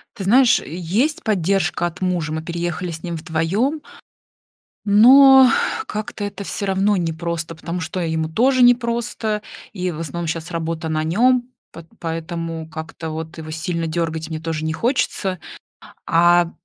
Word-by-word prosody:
Ты 200 -5 -6
знаешь, 245 +5 +5
есть 200 - -2
поддержка 190 -4 0
от 175 +1 -5
мужа, 175 -5 -1
мы 160 - -3
переехали 170 +1 -4
с 160 -1 -7
ним 170 -2 -4
вдвоем. 180 - -1 1.0
Но 265 +6 +8 0.4
как-то 210 0 -5
это 205 0 -5
всё 200 - -4
равно 195 +1 +1
непросто, 165 -1 -3
потому 170 +3 -5
что 180 +3 -4
ему 160 -2 -1
тоже 255 +8 +3
непросто. 235 -3 +1 0.3
И 180 -3 -2
в 160 - -7
основном 165 +2 -4
сейчас 160 +1 -4
работа 165 -1 -3
на 155 0 -1
нем, 245 +10 +3 0.3
п 165 - -11
поэтому 165 -1 -4
как-то 160 -1 -7
вот 160 +1 -6
его 155 -1 -7
сильно 165 +1 -3
дергать 160 -1 -3
мне 160 -1 -4
тоже 160 -1 -3
не 160 - -1
хочется. 195 - -1 0.7
А, 175 +1 +4
175 Hz, 150 wpm, -20 LUFS, 160-210 Hz, 1.0 s, Но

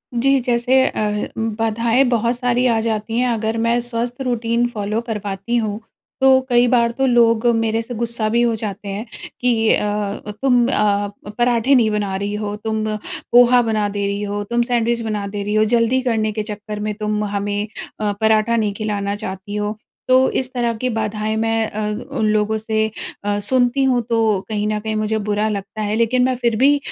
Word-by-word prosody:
जी, 275 +3 +3
जैसे 245 +1 +2
अ, 210 -1 -1
बाधाएँ 225 +3 +1
बहुत 235 0 +1
सारी 245 0 +1
आ 225 -2 +2
जाती 225 0 -2
हैं, 250 - +2
अगर 225 -1 -1
मैं 235 +1 +2
स्वस्थ 240 +1 -4
रूटीन 240 -1 0
फ़ॉलो 215 -1 -2
करवाती 205 +1 -3
हूँ, 215 -2 -2 0.4
तो 265 0 +6
कई 245 0 +4
बार 235 -1 +3
तो 270 +3 0
लोग 235 -2 +3
मेरे 225 0 0
से 245 +2 -7
गुस्सा 235 -1 -2
भी 235 +2 +2
हो 235 -1 +2
जाते 210 -2 -6
हैं 205 +4 -4 0.4
कि 230 -3 +2
अ, 210 0 -2
"तुम 245 -3 +4
अ, 205 -4 +1 0.3
पराठे 240 +2 +3
नहीं 230 -4 +4
बना 205 -2 -1
रही 200 +2 -3
हो, 210 -1 -3
तुम 220 0 -3 0.5
पोहा 245 +1 +6
बना 215 -3 0
दे 200 0 -2
रही 200 +1 -2
हो, 205 0 -3
तुम 235 +3 0
सैंडविच 235 -1 +1
बना 215 -3 -3
दे 200 0 -4
रही 210 +1 -2
हो। 215 - +4
जल्दी 235 +3 +2
करने 220 -4 0
के 215 0 -3
चक्कर 210 0 -6
में 210 - -1
तुम 210 0 -2
हमें 205 +1 -2 0.3
अ, 210 -1 0
पराठा 220 +1 +3
नहीं 210 -3 0
खिलाना 205 -1 -2
चाहती 205 +1 -6
हो।" 210 0 -2 0.3
तो 255 +1 +5
इस 255 -1 -4
तरह 240 -2 0
की 255 - 0
बाधाएँ 215 -1 -2
मैं 225 0 0
अ, 215 - -5 0.4
उन 220 - +1
लोगों 215 +1 +1
से 220 0 0 0.4
अ, 205 0 0
सुनती 250 +5 +1
हूँ, 255 -2 +2
तो 225 -3 +2
कहीं 210 -1 -1
न 215 0 -1
कहीं 220 0 -3
मुझे 215 0 0
बुरा 210 +1 +1
लगता 200 +1 -5
है, 210 0 -1
लेकिन 235 +2 +2
मैं 255 0 +1
फिर 235 -2 0
भी 280 +4 +5
220 Hz, 195 wpm, -19 LUFS, 210-240 Hz, 0.5 s, तो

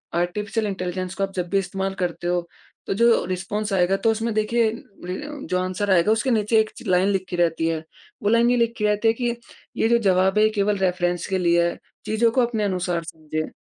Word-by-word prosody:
Artificial 210 +5 -1
intelligence 185 -1 -4
को 195 - -1
आप 195 - -2
जब 175 -1 -2
भी 200 - +1
इस्तेमाल 195 +1 -3
करते 175 -1 -2
हो 175 -1 0 0.4
तो - - 0
जो 230 +3 +4
रिस्पॉन्स 200 +4 -3
आएगा 180 +1 +3
तो 225 - +4
उसमें 225 +1 -2
देखिए 220 +2 +2
अ, - - -6 0.3
जो 270 +3 -4
आंसर 185 +2 -2
आएगा 185 +3 +4
उसके 225 +4 +1
नीचे 220 0 +3
एक 215 0 +1
च - - -10
लाइन 185 +1 +3
लिखी 190 -2 -2
रहती 165 -1 +1
है। 160 -1 -2 0.4
वो 205 - +2
लाइन 235 +2 +4
ये 245 - +2
लिखी 230 -2 0
रहती 210 +2 +2
है 225 - +5
कि 240 0 -2 0.4
ये 225 - +2
जो 235 - +5
ज़वाब 190 +1 +3
है 215 - +5
केवल 210 -1 0
रेफरेंस 180 -2 0
के 190 -1 0
लिए 170 -1 +3
है - - -7 0.3
चीज़ों 225 +2 +2
को 255 - +2
अपने 225 -3 -2
अनुसार 180 -3 -1
समझें। 155 -1 -5
195 Hz, 215 wpm, -23 LUFS, 180-220 Hz, 0.4 s, है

